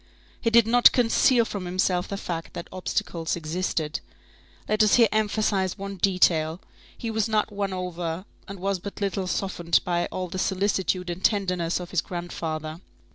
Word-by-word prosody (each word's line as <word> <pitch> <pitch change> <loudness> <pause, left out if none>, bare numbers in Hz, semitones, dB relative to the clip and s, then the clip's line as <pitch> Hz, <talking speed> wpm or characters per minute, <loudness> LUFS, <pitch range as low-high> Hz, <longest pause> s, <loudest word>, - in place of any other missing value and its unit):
He 230 - +2
did 230 -1 +6
not 240 +2 +7
conceal 240 0 +4
from 200 -4 -5
himself 180 0 0
the 200 - -4
fact 165 -4 -5
that - - -6
obstacles 170 -2 -2
existed. 160 -1 -2 0.7
Let 215 +1 +2
us 210 -1 +5
here 235 -2 +6
emphasize 210 -3 +1
one 200 0 -6
detail, 170 -3 +2 0.4
he 230 - -4
was 220 0 0
not 215 -1 +1
won 200 -1 -2
over 180 -1 -4 0.2
and 195 -1 -8
was 195 0 -1
but 200 +3 -8
little 195 -2 -1
softened 175 -3 +1
by 175 -1 0
all 185 0 -4
the 185 +2 -5
solicitude 190 -2 0
and 175 +2 -7
tenderness 180 -5 +1
of 175 -1 -8
his 180 - +2
grandfather. 165 -2 -5
185 Hz, 165 wpm, -25 LUFS, 175-205 Hz, 0.7 s, not